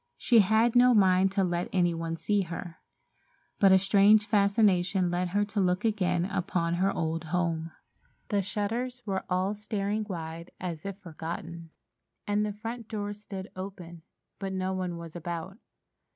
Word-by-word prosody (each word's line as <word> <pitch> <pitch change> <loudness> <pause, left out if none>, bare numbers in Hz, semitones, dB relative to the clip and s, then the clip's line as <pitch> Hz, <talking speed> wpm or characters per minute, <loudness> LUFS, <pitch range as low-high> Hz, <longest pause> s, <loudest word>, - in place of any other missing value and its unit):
She 235 -2 +4
had 220 +4 +3
no 245 0 +6
mind 190 -1 +4
to 195 -1 +2
let 175 -1 -1
any 175 -2 +2
one 165 0 -3
see 205 +3 +1
her, 175 -1 -6 0.8
but 195 -2 +6
a 190 - +8
strange 200 +2 +5
fascination 200 -4 +2
led 180 +1 0
her 205 +3 +1
to 205 0 -3
look 180 +1 +1
again 180 -5 +1
upon 180 -3 -1
her 190 +3 +2
old 165 -1 -2
home. 165 -1 -1 0.6
The 205 -1 +2
shutters 230 +6 -3
were 195 -2 -2
all 185 +2 +1
staring 210 0 -2
wide, 165 -1 -6
as 175 -1 -5
if 195 -1 -5
forgotten, 170 -1 -7 0.6
and 205 0 +1
the 210 - -1
front 225 +2 -7
door 205 -2 -4
stood 200 -2 -8
open, 185 -3 -8 0.4
but 195 -1 -4
no 190 0 -1
one 180 -2 -3
was 170 -1 -9
about. 175 +4 -5
190 Hz, 160 wpm, -28 LUFS, 175-205 Hz, 0.8 s, a